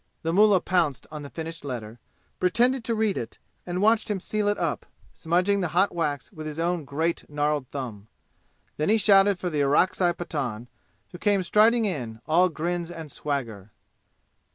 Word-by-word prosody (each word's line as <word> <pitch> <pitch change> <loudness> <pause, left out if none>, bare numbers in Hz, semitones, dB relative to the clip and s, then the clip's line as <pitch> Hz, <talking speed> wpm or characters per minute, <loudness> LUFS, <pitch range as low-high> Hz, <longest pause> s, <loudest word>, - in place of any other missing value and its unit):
The 165 0 -1
mullah 205 -1 +5
pounced 165 -8 0
on 150 -1 -6
the 140 - -8
finished 165 0 -7
letter, 120 -4 -6 0.4
pretended 235 +7 +2
to 230 - 0
read 215 -2 0
it, 115 - -7 0.3
and 180 +2 -2
watched 220 +1 +3
him 205 -2 -1
seal 210 +2 -1
it 205 - +1
up, - - -2 0.3
smudging 180 +5 +1
the 180 - 0
hot 195 +2 +3
wax 150 -6 -2
with 155 -1 -7
his 150 0 -6
own 170 -1 -1
great 160 +5 -2
gnarled 150 -2 -1
thumb. 115 -7 -6 0.7
Then 155 - 0
he 220 - +5
shouted 200 -1 +5
for 180 -1 -3
the 150 -2 0
Orakzai 175 +5 +3
Pathan, 125 -10 -4 0.4
who 175 - -10
came 200 -1 +2
striding 220 +5 +4
in, 125 - -4
all 175 +3 +4
grins 170 +1 -3
and 165 -4 -7
swagger. 115 -9 -4
170 Hz, 175 wpm, -26 LUFS, 145-195 Hz, 0.7 s, mullah